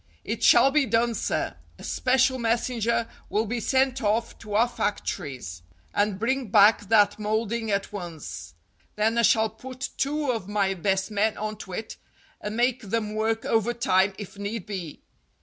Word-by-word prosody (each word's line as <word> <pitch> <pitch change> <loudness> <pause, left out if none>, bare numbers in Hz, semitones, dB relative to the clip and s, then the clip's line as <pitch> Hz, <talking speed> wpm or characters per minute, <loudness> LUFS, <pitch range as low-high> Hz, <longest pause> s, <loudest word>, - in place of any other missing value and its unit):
"It - - -3
shall 275 - +6
be 290 -2 +2
done, 230 +1 +2
sir. - - -2 0.2
A - - -13
special 260 0 +2
messenger 235 0 0 0.2
will 215 +2 +1
be 235 +3 -2
sent 265 +2 +1
off 225 +2 0
to 210 -2 -6
our 230 +3 +4
factories, 135 - -4 0.3
and 205 -1 +1
bring 255 +4 -1
back 205 0 +5
that 205 -2 +4
moulding 220 +1 -1
at 200 0 -1
once. 155 - -7 0.4
Then 220 +2 +1
I - - +5
shall 220 -1 +4
put 255 +3 -7
two 290 0 0
of 225 -6 -4
my 200 -2 +1
best 190 +2 -1
men 210 +1 +1
on 215 0 -3
to 190 -3 -9
it, 220 +4 -6 0.4
and 210 +2 -4
make 250 +1 +2
them 215 0 -2
work 220 +1 -1
overtime 205 -4 +2
if 205 -1 -9
need 205 0 -4
be. 185 -7 -6
220 Hz, 165 wpm, -26 LUFS, 200-235 Hz, 0.4 s, shall